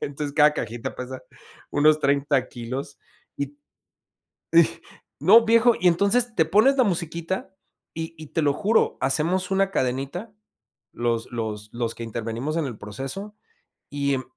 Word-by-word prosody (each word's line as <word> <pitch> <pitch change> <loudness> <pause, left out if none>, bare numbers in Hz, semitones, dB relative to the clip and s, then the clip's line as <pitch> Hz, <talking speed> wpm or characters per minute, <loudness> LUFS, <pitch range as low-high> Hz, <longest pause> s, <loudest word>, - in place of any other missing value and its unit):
entonces, 145 0 -4
cada 150 0 +6
cajita 120 -4 -4
pesa 130 0 -7 0.5
unos 150 +1 +4
30 140 -2 +1
kilos 130 +4 -6 0.4
y 140 0 -4 1.0
y 170 - +9 0.6
No, 220 +9 +7
viejo, 230 +1 +5
y 180 - +3
entonces 220 +7 +2
te 160 - +4
pones 220 - +4
la 255 - +5
musiquita, 170 +1 -3 0.4
y 165 0 -6
y 155 -1 -10
te 160 +2 -1
lo 145 -1 +3
juro, 215 +7 +1
hacemos 165 +8 +1
una 195 0 +2
cadenita, 135 - -2 0.6
los 120 0 -2
los 110 -2 -4
los 120 -1 -3
que 115 - -7
intervenimos 115 +6 -4
en 160 - 0
el 120 -5 -6
proceso 135 - -7 0.5
y, 140 -1 0
em, 130 - -3
145 Hz, 145 wpm, -24 LUFS, 130-185 Hz, 1.0 s, y